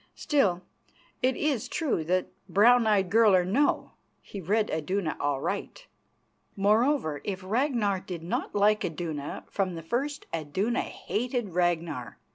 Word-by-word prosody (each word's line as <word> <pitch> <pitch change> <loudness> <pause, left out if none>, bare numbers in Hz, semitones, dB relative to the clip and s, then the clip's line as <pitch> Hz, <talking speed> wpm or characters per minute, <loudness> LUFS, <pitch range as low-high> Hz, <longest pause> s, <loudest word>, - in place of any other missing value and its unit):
Still, 195 - +1 0.6
it 255 0 +2
is 285 -7 0
true 290 - -1
that, 185 +2 0 0.2
brown 235 +3 +5
eyed 195 -4 +2
girl 220 -2 +6
or 180 -1 +3
no, 265 +11 +1 0.3
he 200 - -9
read 210 +5 +1
Iduna 160 +1 -1
aright. 145 -2 -2 0.7
Moreover, 210 - +2
if 190 -2 -4
Ragnar 220 -2 +1
did 175 -3 -7
not 175 - -3
like 210 +1 +3
Iduna, 155 -3 -4
from 190 -3 -1
the 165 - -7
first 275 - -2
Iduna 175 +9 -1
hated 240 -1 -3
Ragnar. 170 -7 -1
200 Hz, 130 wpm, -28 LUFS, 170-235 Hz, 0.7 s, girl